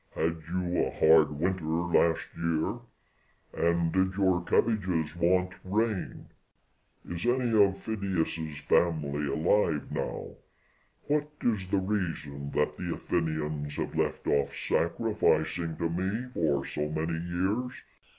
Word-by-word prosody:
had 80 +1 0
you 90 0 0
a - - -2
hard 80 -1 +5
winter 90 +1 0
last 85 +1 +2
year? 85 +7 -1 0.7
and 85 -1 +1
did 95 0 +2
your 95 -3 +2
cabbages 90 -8 +1
want 90 +2 +2
rain? 105 +1 -1 0.8
is 85 -1 -4
any 125 -1 +2
of 100 -1 +1
Phidias's 85 -8 -2
family 75 -3 +1
alive 80 +1 +1
now? - - -3 0.7
what 150 0 0
is 100 -6 0
the 100 - +2
reason 80 -8 -2
that 75 +1 0
the - - -3
Athenians 75 -3 -2
have - - -3
left - - -1
off 70 -1 +1
sacrificing 80 +1 0
to 85 - 0
me 95 +8 -2
for 75 - 0
so 75 0 -3
many 80 +2 -2
years? 95 +9 -1
85 Hz, 120 wpm, -29 LUFS, 80-95 Hz, 0.8 s, hard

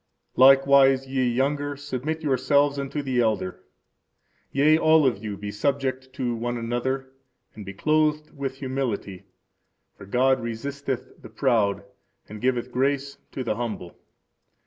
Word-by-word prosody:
Likewise, 135 0 +6
ye 130 -1 0
younger, 140 +3 -1
submit 145 +3 -4
yourselves 140 +1 +2
unto 140 +1 -3
the 130 -2 -1
elder. 110 -5 -1 0.9
Yea, 150 +3 +4
all 155 -1 +4
of 115 -5 0
you 105 -2 -4
be 105 0 -6
subject 130 +3 -2
one 120 -1 -2
to - - -4
another, 130 +3 -2 0.4
and 105 -3 -10
be 100 - -6
clothed 155 +3 +1
with 135 -2 -4
humility; 130 -8 -4 0.7
for 100 - -13
God 130 +4 +2
resisteth 130 +3 -5
the - - -11
proud, 110 -8 +1 0.4
and 105 0 -9
giveth 125 -1 0
grace 140 +2 -1
to 130 - -3
the 110 -3 -2
humble. 110 -7 -5
130 Hz, 135 wpm, -25 LUFS, 120-140 Hz, 0.9 s, Likewise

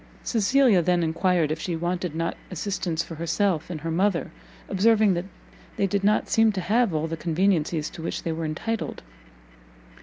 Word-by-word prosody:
Cecilia 230 -2 +3
then 175 0 +2
enquired 165 -1 +1
if 155 - -2
she 170 +1 -3
wanted 175 0 -2
not 165 +1 -1
assistance 180 -2 -2
for - - -9
herself 170 +1 0
and 160 -4 -5
her 165 +1 -3
mother, 185 +1 +1 0.4
observing 210 +1 +3
that 175 +1 -2 0.5
they 200 - +2
did 195 +1 -1
not 210 +1 +2
seem 225 -1 +4
to 190 - -2
have 220 +4 +2
all 155 0 -1
the 165 0 -3
conveniencies 165 -2 0
to - - -9
which 165 - -4
they 165 - -2
were 160 0 -3
entitled. 220 +9 -3
175 Hz, 175 wpm, -25 LUFS, 165-200 Hz, 0.5 s, seem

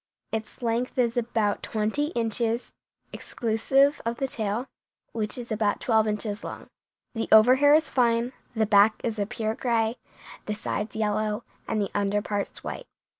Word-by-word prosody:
Its 220 +3 -5
length 235 +3 -1
is 240 -1 +2
about 225 -3 0
twenty 220 +7 -1
inches, 230 +1 -1 0.4
exclusive 270 +5 +1
of 230 +1 -2
the 270 - -1
tail, 220 0 -2 0.5
which 215 0 -3
is 240 -1 -7
about 215 -1 +1
twelve 220 -2 +2
inches 210 0 -2
long. - - -7 0.5
The 225 -2 -2
overhair 260 +7 +7
is 315 -3 0
fine, 240 0 +2 0.2
the 220 -1 +2
back 210 +1 +5
is 225 -2 -2
a 200 - 0
pure 220 -2 -2
gray, 230 -1 0 0.5
the 210 - -1
sides 210 0 -4
yellow, 215 +1 -1 0.2
and 220 - -1
the 200 - -1
under 205 0 +1
parts 205 -2 -3
white. - - -6
225 Hz, 155 wpm, -26 LUFS, 215-240 Hz, 0.5 s, overhair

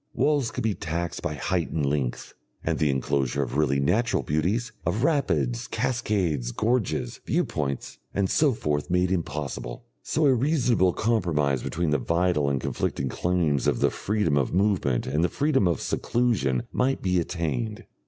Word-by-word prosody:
Walls 145 -5 +2
could - - -4
be 110 -2 +1
taxed 85 -1 -3
by 75 - -2
height 85 +3 -1
and 75 -3 -1
length, 70 -3 -2 0.3
and - - -1
the 75 - +2
enclosure 70 0 0
of 65 0 -5
really 70 -2 +2
natural 110 - +1
beauties, 100 +11 0
of 115 - -1
rapids, 80 - +1
cascades, 105 - -1
gorges, 115 -1 -1
viewpoints, 70 -3 -2
and 100 -1 0
so 150 +8 +3
forth 75 - -2
made 90 +1 +2
impossible. 70 -8 -3 0.2
So 155 - 0
a 135 - +6
reasonable 125 - +2
compromise 80 - +1
between 85 +3 -1
the 75 - +2
vital 85 -4 +1
and 70 -1 0
conflicting 65 +1 -2
claims 85 -6 0
of - - +2
the - - +3
freedom 105 -8 0
of 70 +4 -1
movement 95 - +1
and 75 +5 0
the 90 - +2
freedom 140 -9 +2
of 85 -5 0
seclusion 110 - 0
might 135 +1 0
be 90 -1 +2
attained.... 105 +7 -2
85 Hz, 160 wpm, -26 LUFS, 70-110 Hz, 0.3 s, a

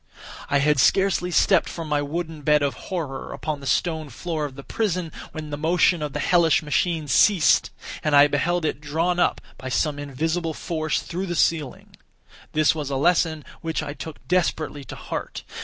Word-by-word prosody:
I 140 - +3
had 145 0 +2
scarcely 190 +3 +3
stepped 175 - +3
from 165 -2 -6
my 150 -1 +1
wooden 160 +1 -4
bed 150 0 +3
of 140 - 0 0.2
horror 155 -8 -4
upon 155 -2 -4
the 140 - -8
stone 160 -2 0
floor 155 +4 -3
of 135 -3 -7
the 140 - -9
prison, 180 -5 -2 0.2
when 155 -1 -7
the 145 - -4
motion 170 +1 +3
of 150 -2 -3
the 150 - -3
hellish 165 0 +3
machine 155 +1 0
ceased 170 +4 +4 0.3
and 150 -1 +2
I 145 0 +8
beheld 160 +4 0
it 150 - -2
drawn 165 +4 0
up, - - +2 0.2
by 130 - -6
some 145 +2 0
invisible 160 +4 -2
force, 155 -2 -2
through 185 +3 -4
the 175 - -2
ceiling. 155 -6 -1 0.6
This 155 -1 +4
was 150 -3 -4
a 140 - -2
lesson 160 +1 +2 0.2
which 160 -1 -2
I 145 -2 -5
took 150 +2 -9
desperately 160 -5 0
to - - -8
heart. - - -6
155 Hz, 185 wpm, -24 LUFS, 145-170 Hz, 0.6 s, I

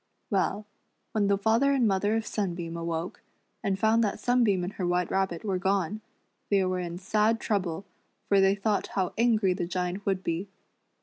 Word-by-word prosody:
Well, 200 +1 0 0.5
when 210 -2 +1
the 200 0 +3
father 230 +7 +3
and 255 -4 +3
mother 205 +2 +1
of 225 0 -1
Sunbeam 175 -6 -3
awoke, 170 +1 -4 0.4
and 195 -3 0
found 220 +3 +3
that 205 - -1
Sunbeam 235 -7 +2
and 185 +3 -4
her 180 - -2
White 180 0 0
Rabbit 190 -3 -1
were 190 -3 0
gone, 195 +2 0 0.5
they 195 -2 +3
were 185 0 -1
in 175 -1 -4
sad 215 +4 +1
trouble, 195 -4 -2 0.4
for 200 -1 +4
they 195 +1 +4
thought 205 +1 0
how 185 -2 0
angry 220 -5 +3
the 180 -2 -3
Giant 180 +2 -3
would 190 -1 0
be. 170 +4 -2
195 Hz, 180 wpm, -28 LUFS, 180-215 Hz, 0.5 s, for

